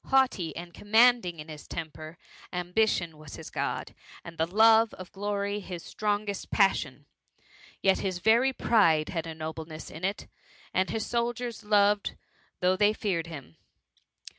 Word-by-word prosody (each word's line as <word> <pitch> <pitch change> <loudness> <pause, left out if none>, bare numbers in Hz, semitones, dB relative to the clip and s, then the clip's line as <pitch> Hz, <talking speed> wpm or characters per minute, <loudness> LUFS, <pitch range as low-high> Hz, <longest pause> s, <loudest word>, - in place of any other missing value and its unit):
Haughty 255 -11 +2
and 170 0 -8
commanding 220 -4 +4
in 150 - -8
his 155 -2 -10
temper 160 0 -7 0.2
— - - -20
ambition 180 -3 0
was 155 -2 -10
his - - -9
God, - - -3 0.3
and 170 - -10
the 160 0 0
love 220 +4 +5
of 185 -1 -10
glory 200 0 -2
his 180 -4 -7
strongest 205 -1 -2
passion; 150 - +1 0.8
yet 190 -1 +4
his 185 -2 -2
very 230 +8 +4
pride 165 -12 +3
had 165 -2 -3
a 160 - -6
nobleness 160 0 -7
in 160 - -10
it, 195 +2 -2 0.5
and 185 +1 +1
his 220 -1 -2
sol 235 0 0
diers 240 -1 -6
loved 205 -1 +3 0.5
though 180 +1 +3
they 205 +2 +3
feared 180 -6 -2
him. 140 - -10
190 Hz, 155 wpm, -28 LUFS, 165-215 Hz, 0.8 s, love